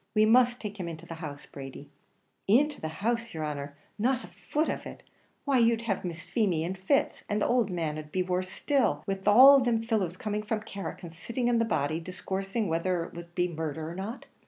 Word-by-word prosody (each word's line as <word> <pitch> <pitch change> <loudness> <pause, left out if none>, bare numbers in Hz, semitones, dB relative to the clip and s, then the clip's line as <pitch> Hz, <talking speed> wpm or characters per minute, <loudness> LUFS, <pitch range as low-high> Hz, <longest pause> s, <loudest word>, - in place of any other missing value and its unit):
We 215 0 +6
must 245 +2 +5
take 210 -1 -6
him 180 - -3
into 165 0 -7
the 165 - -7
house, 145 -3 -6
Brady." 135 -1 -10 0.6
"Into 285 +9 +3
the 160 - -2
house, 230 +6 -2
yer 160 - -3
honer! 145 -1 -4 0.2
not 255 +3 +1
a - - -9
foot 305 +2 -2
of - - -3
it! - - -10 0.4
why, 275 -3 +3
you'd 230 0 +3
have 205 -5 -1
Miss 170 -2 -5
Feemy 185 -9 +1
in 175 +3 -2
fits; 195 +10 0
and 205 0 +1
the - - +1
owld 240 -4 +2
man'd 155 -4 -3
be 185 +2 +1
worse 185 0 -1
still, 280 +3 +1
wid 195 0 -3
all 265 +6 +9
thim 235 -2 +2
fellows 205 -6 0
coming 210 +1 -2
from 215 0 -2
Carrick 200 -3 -6
and 170 -2 -8
sitting 235 +8 -2
on 235 -1 +3
the 230 - +3
body, 155 -6 0
discoursing 195 +4 -3
whether 170 +1 0
it - - -10
wor 170 - -6
to 170 - -16
be 180 0 +2
murdher 160 -2 -4
or 165 - -5
not." 200 +7 -6
195 Hz, 220 wpm, -29 LUFS, 165-230 Hz, 0.6 s, all